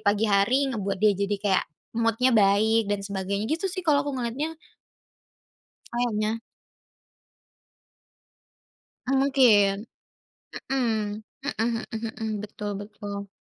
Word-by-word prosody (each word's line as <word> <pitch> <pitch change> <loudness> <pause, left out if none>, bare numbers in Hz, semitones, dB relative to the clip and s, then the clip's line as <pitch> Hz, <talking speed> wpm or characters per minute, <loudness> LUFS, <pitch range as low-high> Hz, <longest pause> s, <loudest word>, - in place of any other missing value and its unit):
pagi 205 +2 +2
hari, 240 +7 +3
ngebuat 200 -4 -2
dia 210 +1 +4
jadi 200 +1 -1
kayak 195 -2 +3 0.3
mood-nya 230 +2 +2
baik 215 +1 +4
dan 200 -1 -1
sebagainya, 200 +1 -2
gitu 345 +4 -1
sih 370 0 -5
kalau 295 -3 +4
aku 285 -2 -3
ngelihatnya. 265 +7 -3 1.4
Kayaknya. 225 -2 0 2.7
Mmm, 270 0 +3
mungkin. 220 -7 +4 0.9
Mmm. 220 -5 0 0.2
Mhm 230 -4 -1
mhm 225 0 -3
mhm. 220 -2 -2
Betul 210 0 -5
betul 205 -1 -7
220 Hz, 105 wpm, -26 LUFS, 205-250 Hz, 2.7 s, dia